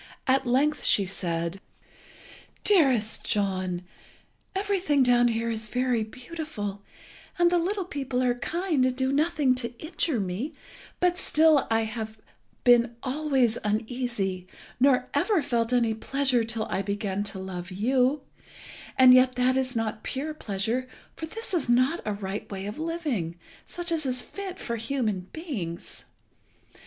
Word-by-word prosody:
At 270 -1 +2
length 285 +5 +2
she 200 - +4
said 170 -1 -3 1.0
"Dearest 260 - +3
John, 185 -3 -1 0.7
everything 380 -8 +2
down 245 -1 +5
here 230 0 0
is 220 -1 -4
very 250 -1 +1
beautiful, 240 -4 -6 0.6
and 345 -1 +4
the 350 - +4
little 385 +2 -1
people 270 -6 -2
are 245 -1 +3
kind 330 +3 0
and 255 0 +2
do 260 0 0
nothing 295 -3 +3
to 240 -2 -4
injure 310 -3 -1
me, 200 - -3 0.5
but 360 0 +2
still 310 -4 +4
I 225 0 +3
have 220 0 -4 0.5
been 240 -1 +5
always 265 -4 +1
uneasy, 215 -4 -2 0.3
nor 260 0 +4
ever 420 -5 +2
felt 235 -3 0
any 235 -3 +3
pleasure 255 +1 +1
till 225 -1 -2
I - - -1
began 200 0 -2
to 200 -1 -5
love 185 -1 -6
you; 255 +8 +1 0.7
and 255 -1 +9
yet 255 0 +5
that 250 +1 +2
is 260 -1 0
not 220 -1 -2
pure 295 +4 -3
pleasure, 225 0 -2 0.3
for 320 - -5
this 450 +4 -6
is 315 -8 0
not 255 +8 +3
a 210 - -1
right 200 0 -5
way 195 -1 -5
of 210 +7 -6
living, 300 - -2 0.3
such 350 -1 -6
as 310 -4 0
is 250 -1 -1
fit 390 -2 -7
for 235 -1 -3
human 220 -6 -2
beings. 220 - -6
250 Hz, 145 wpm, -27 LUFS, 215-295 Hz, 1.0 s, and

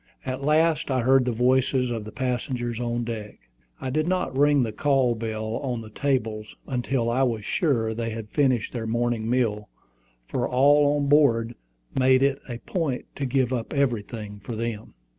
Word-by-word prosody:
At 130 +1 -4
last 155 +1 +2
I 130 -2 +1
heard 130 +1 +4
the 125 - +1
voices 125 +1 +2
of 115 -3 -4
the 110 - -8
passengers 120 -2 -2
on 120 0 -1
deck. 110 -3 -6 0.4
I 130 - -4
did 155 +3 0
not 185 -7 -1
ring 145 -1 +4
the 115 - -2
call 135 0 +2
bell 110 0 -3
on 125 -4 -3
the 110 -1 -11
table 115 -5 -1 0.2
until 125 -1 -1
I 120 +3 +1
was 115 -5 0
sure 115 -9 +1
they 115 0 -3
had 110 -1 -7
finished 130 -7 +1
their 115 -3 -3
morning 120 -1 -1
meal, 110 -5 0 0.6
for - - -1
all 145 +3 +4
on 145 - 0
board 120 -6 +3 0.4
made 130 0 +4
it 140 0 +2
a 120 - -4
point 145 -2 -3
to 140 - -1
give 130 -1 +1
up 120 +2 -3
everything 115 -6 -2
for 120 - -5
them. 115 -1 -5
125 Hz, 180 wpm, -25 LUFS, 115-135 Hz, 0.6 s, heard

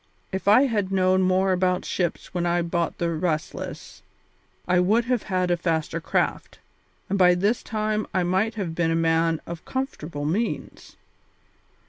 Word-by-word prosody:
If 190 +1 -4
I 215 +6 +7
had 210 -8 0
known 185 0 +3
more 185 +1 +2
about 180 0 +1
ships 175 -3 -3
when 175 -2 -1
I 175 0 +1
bought 170 0 -1
the 170 -1 -1
Restless 160 -1 -4 0.7
I 180 0 +3
would 215 +6 +3
have 250 -2 0
had 185 -1 +1
a 175 - +2
faster 165 -1 -1
craft, - - -1 0.5
and 200 +1 -1
by 180 -1 +6
this 205 +6 +1
time 215 -1 -2
I 185 - +1
might 190 +5 0
have 190 -6 -3
been 165 0 0
a 165 - +1
man 165 0 +2
of 170 -1 -7
comfortable 170 - -4
means. 205 +10 -3
180 Hz, 160 wpm, -24 LUFS, 170-200 Hz, 0.7 s, I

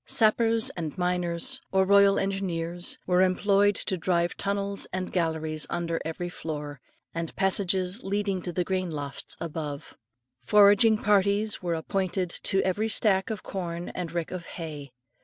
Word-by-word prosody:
Sappers 225 +1 +3
and 160 -2 -5
miners, 180 -2 0
or 190 0 +3
royal 200 0 +5
engineers, 175 -3 -2
were 180 0 +3
employed 200 +2 +3
to 190 - -2
drive 170 0 0
tunnels 200 0 -1
and 185 0 -3
galleries 160 -3 -1
under 170 -1 -2
every 165 +2 -4
floor, 150 -5 -6 0.3
with 165 -1 -4
passages 190 +1 +1
leading 200 -1 -1
to 175 - -4
the 180 +1 0
grain 185 0 -1
lofts 145 -3 -5
above. 150 -3 -5 0.5
Foraging 210 - +6
parties 205 +1 +2
were 175 -2 -1
appointed 185 +2 -2
to 195 +1 +1
every 205 +4 0
stack 195 -3 +2
of 215 -3 -4
corn 175 -2 -5
and 175 -3 -5
rick 170 -1 -3
of 180 -2 -6
hay. 150 -5 -7
185 Hz, 145 wpm, -27 LUFS, 170-200 Hz, 0.5 s, Foraging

